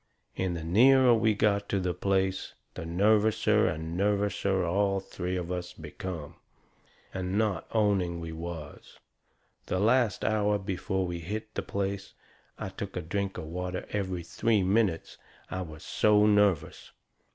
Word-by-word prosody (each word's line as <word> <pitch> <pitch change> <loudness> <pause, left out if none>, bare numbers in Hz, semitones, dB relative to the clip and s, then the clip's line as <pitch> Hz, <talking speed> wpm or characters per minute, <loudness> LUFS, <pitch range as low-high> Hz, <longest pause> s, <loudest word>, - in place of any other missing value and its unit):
And 90 -2 -1
the 80 - -6
nearer 125 +8 +6
we 110 -2 +3
got 100 -1 +1
to 100 - +1
the 90 -1 -1
place 95 +1 -1 0.2
the 80 - -6
nervouser 105 +5 +3
and 80 +2 -3
nervouser 100 -1 +1
all 100 +2 +1
three 90 -1 -4
of 90 0 -4
us 90 0 -4
become. 80 0 -7 0.8
And 95 +1 -2
not 105 -6 0
owning 100 -6 +1
we 85 -1 -6
was. 80 -2 -8 0.7
The - - -1
last 115 +1 +2
hour 105 -1 +2
before 95 -1 -2
we 85 -1 -4
hit 110 +6 -5
the - - -2
place, 100 0 -4 0.4
I - - -4
took 95 0 -7
a - - -1
drink 100 +4 -2
of - - -5
water 90 +3 -4
every 95 -4 -2
three 105 +3 +1
minutes, 95 -3 0 0.3
I 95 - -2
was 80 -3 -8
so 105 0 +3
nervous. 105 -6 +2
95 Hz, 150 wpm, -29 LUFS, 90-105 Hz, 0.8 s, nearer